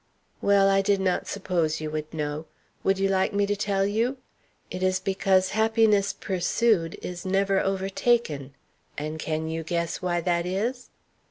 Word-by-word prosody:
"Well, 200 -1 +4
I 195 0 +4
did 200 0 +2
not 185 -1 0
suppose 175 -5 -1
you 155 -1 -4
would 155 0 -4
know. 150 0 -4 0.4
Would 195 0 +2
you 195 0 +2
like 190 +2 +1
me 200 0 +2
to 205 +1 0
tell 200 -1 0
you? 230 +6 0 0.5
It 185 - -5
is 185 0 +2
because 190 -1 +2
happiness 220 -2 +3
pursued 190 -1 0
is 180 -1 -5
never 195 +1 +2
overtaken. 190 - 0 0.4
And 155 +2 -4
can 160 0 -2
you 160 0 -3
guess 170 +1 -2
why 175 -1 0
that 170 0 0
is? 235 +7 -2
190 Hz, 160 wpm, -26 LUFS, 165-200 Hz, 0.5 s, Well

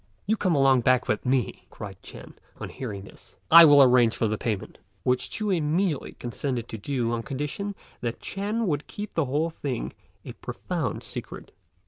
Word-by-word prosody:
"You 220 - +2
come 185 -6 +1
along 135 -2 +5
back 125 +1 +3
with 110 - -1
me," 130 -2 0
cried - - -9
Ch'ên, - - -11 0.3
on - - -5
hearing 105 -7 -6
this, 100 - -16 0.2
"I 165 +1 +11
will 145 -2 +8
arrange 125 -3 +5
for 115 - +1
the 110 - 0
payment," 105 -3 -4 0.2
which 125 0 +1
Ch'u 215 -2 -2
immediately 165 -1 0
consented 120 0 -4
to 110 - -5
do 120 0 -1
on 120 -1 -1
condition 150 - -4 0.2
that 120 -1 -3
Ch'ên 210 +4 -2
would 150 -5 -1
keep 210 0 -7
the 165 - +1
whole 150 +5 0
thing 140 -6 -4 0.3
a - - -6
profound - - -4
secret. - - -8
135 Hz, 175 wpm, -26 LUFS, 120-165 Hz, 0.3 s, I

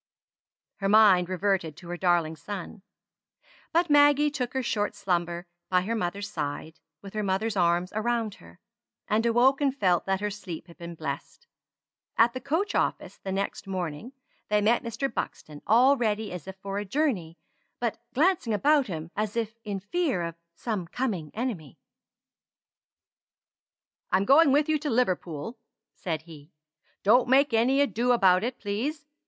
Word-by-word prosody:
Her 195 -1 -1
mind 200 -4 +6
reverted 185 -4 -1
to 175 0 -12
her 175 - -3
darling 175 -3 +1
son; 190 +5 -7 0.9
but 340 +1 +2
Maggie 290 0 +5
took 255 -3 -4
her 265 - 0
short 210 -3 -1
slumber 175 -1 -1 0.2
by 180 -1 +3
her 210 +5 -2
mother's 200 -1 -2
side, 155 -4 -5 0.2
with 195 - -10
her 215 - -1
mother's 205 +3 -1
arms 175 0 +1
around 225 0 -1
her; 85 0 -16 0.5
and 220 +2 +1
awoke 255 +4 +4
and 275 -1 +1
felt 180 -6 +2
that 190 0 +1
her 210 +1 -2
sleep 185 -5 -7
had 170 -1 -16
been 170 0 -7
blessed. 155 - -6 0.7
At 235 +1 +5
the 255 - -5
coach 325 +10 -1
office - - -1
the 190 - -5
next 195 0 -3
morning 185 - -4 0.4
they 210 0 +3
met 220 +3 +3
Mr. 235 +3 -2
Buxton 150 -7 -5
all 250 +6 +6
ready 220 -4 -1
as 180 -1 -7
if 190 - -7
for 195 +1 -4
a - - -3
journey, 200 - -1 0.4
but 235 -2 -2 0.2
glancing 295 - +2
about 285 +4 +3
him 165 -3 -6
as 215 +1 -2
if 230 0 -3
in 205 -2 -4
fear 260 - -1
of 170 0 -4 0.2
some 210 -7 -3
coming 190 - -3
enemy. 215 - -4 2.3
"I'm 190 +1 +3
going 280 +4 +6
with 290 +2 +3
you 310 -1 +1
to 300 0 -3
Liverpool," 220 - -1 0.3
said 160 -3 -4
he. 155 -1 -14 0.5
"Don't 240 +5 +4
make 270 0 +4
any 255 +5 +3
ado 245 -1 +2
about 190 -5 +4
it, 245 +1 -3
please. 265 +10 -3
210 Hz, 160 wpm, -27 LUFS, 180-250 Hz, 2.3 s, mind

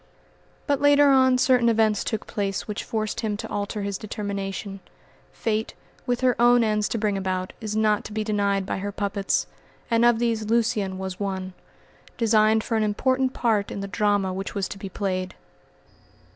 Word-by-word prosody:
But 285 -1 0
later 290 0 +6
on 260 -1 +5
certain 250 -2 +4
events 220 -2 +2
took 220 -2 -3
place 200 -2 -3
which 210 -1 -4
forced 215 -1 -3
him 215 -3 -2
to - - -6
alter 205 +1 -3
his 200 -1 -3
determination. 200 -1 -5 0.5
Fate, 220 -1 -2 0.3
with 245 0 0
her 255 -2 +3
own 240 0 +6
ends 210 -1 +1
to - - -1
bring 205 -2 0
about 185 -1 -3
is 215 -1 -4
not 215 -1 +2
to - - -7
be 215 0 -2
denied 200 -2 0
by 190 - -3
her 205 +1 -3
puppets; 200 0 -1 0.5
and 230 0 +3
of 240 -1 +5
these 230 -2 0
Lucian 220 -5 +1
was 190 -1 -5
one, 190 -2 -3 0.6
designed 220 -1 +3
for 230 - -2
an 220 - +1
important 260 +5 +1
part 215 -4 +1
in 200 - -5
the 200 - -4
drama 200 -1 +1
which 195 +3 -5
was 195 -2 -1
to 200 - -8
be 195 - -6
played. 185 -1 -3
210 Hz, 180 wpm, -24 LUFS, 200-230 Hz, 0.6 s, later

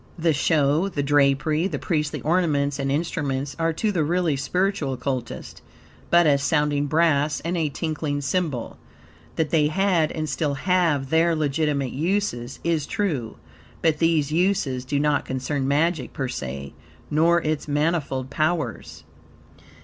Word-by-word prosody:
The 165 -1 +2
show, 150 +3 +2
the 145 -6 -2
drapery, 145 +3 +2
the 155 -7 -3
priestly 150 -1 -2
ornaments 150 -4 +1
and 135 0 -1
instruments, 140 -3 -2
are 165 0 +2
to 210 +6 0
the 175 -6 +1
really 170 -1 +1
spiritual 180 0 -1
Occultist, 125 -1 -5 0.5
but, 175 0 +5
as 140 -2 +3
sounding 145 -1 +1
brass 155 -1 +2
and 170 +3 -2
a 160 -3 0
tinkling 150 -1 -3
cymbal. 145 -4 -2 0.6
That 160 -2 -1
they 155 -3 +3
had, 175 -1 +1
and 155 -1 -3
still 145 0 -1
have, 160 -4 +1
their 165 +1 +3
legitimate 145 -3 0
uses, 155 -6 -2
is 165 -3 0
true, 150 - -2 0.5
but 160 -2 +2
these 160 -3 +2
uses 155 -7 0
do 140 +2 -1
not 150 0 +1
concern 130 +1 -2
magic, 150 -1 0
per 135 - -2
se, 70 - -6 0.4
nor 165 +3 +4
its 155 -2 -2
manifold 145 -3 -1
powers. 155 -5 -2
150 Hz, 140 wpm, -24 LUFS, 140-165 Hz, 0.6 s, but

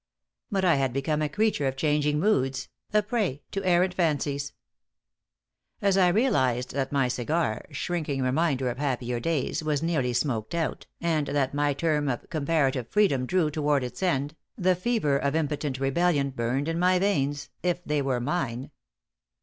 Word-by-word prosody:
But 195 -4 0
I 170 -5 +4
had 135 -2 0
become 150 +3 0
a 150 - 0
creature 210 -6 +1
of 135 - -2
changing 150 +1 +1
moods, 135 -9 +1 0.2
a 210 0 +3
prey 205 - -1
to 195 - -3
errant 180 0 +3
fancies. 145 -5 0 1.3
As 200 -3 +2
I 190 -2 +5
realized 175 - +2
that 135 -1 -2
my 135 -3 +2
cigar 125 0 -1
shrinking 150 -6 -2
reminder 130 -1 +1
of 125 - -8
happier 125 -4 -1
days 155 +2 -1
was 150 -1 0
nearly 140 -7 0
smoked 120 0 -1
out, 165 -2 -2
and 160 -3 0
that 140 -2 0
my 145 -1 +1
term 150 -1 0
of 120 - -3
comparative 140 -5 0
freedom 145 -12 +2
drew 175 -2 +1
toward 145 -2 +1
its 125 - -6
end, 145 -5 0 0.2
the 185 0 +3
fever 180 -7 +1
of 140 +1 0
impotent 150 -3 -1
rebellion 140 0 +1
burned 130 +3 -1
in 165 +1 -1
my 180 +1 +4
veins 145 -7 0
if 180 0 -1
they 150 -1 0
were 135 -3 0
mine. 135 -1 -2
145 Hz, 165 wpm, -27 LUFS, 135-170 Hz, 1.3 s, I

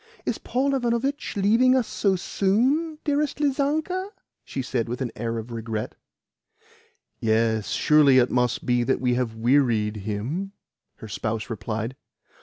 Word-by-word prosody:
"Is - - -2
Paul 275 +3 0
Ivanovitch 255 +1 -1
leaving 230 +6 +4
us 255 -3 +2
so 195 -2 +1
soon, 255 - +1
dearest 295 -1 0
Lizanka?" 305 +7 0 0.3
she 135 - -4
said 120 -3 -2
with 120 - -3
an 125 -4 -2
air 115 +1 -3
of 115 +2 -6
regret. 115 -1 -4 1.3
"Yes. 110 -1 +1
Surely 150 -3 +4
it 125 -1 +4
must 125 -1 0
be 120 -1 +2
that 130 +2 +1
we 125 -1 +1
have 120 -2 -1
wearied 115 -3 +2
him?" 115 - -4 0.4
her 110 - -10
spouse 110 +3 -3
replied. 115 +3 -4
130 Hz, 140 wpm, -25 LUFS, -, 1.3 s, leaving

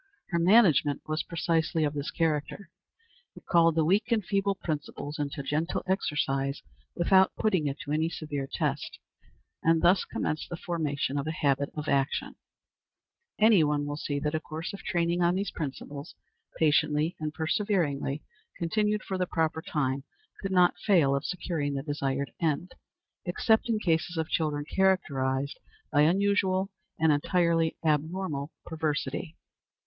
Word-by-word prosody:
Her 170 - 0
management 170 - +4
was 155 +1 0
precisely 165 -1 0
of 145 -1 0
this 145 -1 -3
character. 165 +3 -2 0.6
It - - -14
called 165 -2 +4
the 160 -1 +3
weak 210 +7 +2
and 215 -5 +2
feeble 200 0 +1
principle 150 -3 -4
into 140 -1 -3
gentle 150 +4 -1
exercise, 140 -7 -1 0.3
without 190 +2 +4
putting 190 -9 +1
it 140 +1 -3
to 145 - -6
any 160 +2 +1
severe 145 -4 -4
test, - - -2 0.6
and 165 0 +3
thus 180 +2 +5
commenced 155 - -3
the 175 - -5
formation 145 -5 -2
of 140 - -4
a - - 0
habit 140 -2 +1
of 150 0 -4
action. 140 0 0 1.0
Any 215 -5 +6
one 145 -1 +1
will 145 0 -3
see 145 -1 -3
that 150 +2 -1
a 155 - +1
course 160 +3 -6
of 200 - -7
training 170 0 0
on 175 +1 +3
these 200 +2 -2
principles, 145 -1 -6 0.4
patiently 150 +1 +2
and 155 -1 -2
perseveringly 160 -5 -1 0.3
continued 210 +5 0
for 190 -1 -3
the 180 - 0
proper 160 -2 0
time, 135 -4 -1 0.4
could 195 - -2
not 180 -1 +4
fail 165 -9 +3
of 140 - -2
securing 165 -5 -2
the 135 - -3
desired 140 -2 -2
end, 165 +2 -1 0.5
except 220 +6 +2
in 225 - +2
cases 170 -2 0
of 160 -1 -1
children 150 -2 0
characterized 140 -8 0 0.3
by 145 - +4
unusual 190 +3 +2 0.3
and 160 0 +4
entirely 165 +2 +2
abnormal 155 -1 0 0.2
perversity. 155 0 -3
160 Hz, 150 wpm, -28 LUFS, 145-180 Hz, 1.0 s, Any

